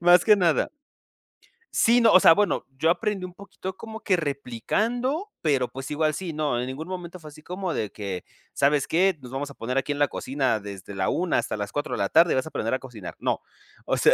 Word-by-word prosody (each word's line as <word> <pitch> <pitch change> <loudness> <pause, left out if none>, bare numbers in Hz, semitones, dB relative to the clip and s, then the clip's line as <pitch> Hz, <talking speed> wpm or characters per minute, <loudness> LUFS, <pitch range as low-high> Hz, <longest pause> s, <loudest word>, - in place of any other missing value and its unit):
más 175 +1 +6
que 210 -1 +7
nada. 175 -5 +2 1.1
Sí, 235 +2 +5
no, 230 -2 +6
o 185 - +8
sea, 165 - +8
bueno, 205 +2 +1
yo 160 - +2
aprendí 200 +2 0
un 180 - -13
poquito 190 -1 -8
como 220 0 -8
que 205 -4 +1
replicando, 220 - -2
pero, 140 -5 +2
pues, 135 +1 -8
igual 155 0 +1
sí, 170 +2 -4
no, 150 -5 0
en 125 - -3
ningún 140 +5 -6
momento 180 -1 -6
fue 160 - -14
así 155 +1 -15
como 180 +1 -4
de 105 - -2
que: 100 -4 -5 0.3
"¿Sabes 140 0 +2
qué? 185 +1 +2
Nos 125 -1 -11
vamos 140 +2 -3
a - - -11
poner 125 +2 -4
aquí 135 +1 0
en 145 - -1
la 145 - +4
cocina 130 -6 -1
desde 100 -1 -8
la 95 -1 0
1 180 0 +1
hasta - - -2
las 105 -1 -4
4 145 - -2
de - - -3
la 100 - 0
tarde 165 +1 +6
y - - +1
vas 130 - 0
a - - -7
aprender 115 -3 -1
a - - 0
cocinar". 120 -9 -9
No. - - -1 0.5
O - - +1
sea, - - +5
155 Hz, 240 wpm, -25 LUFS, 130-185 Hz, 1.1 s, o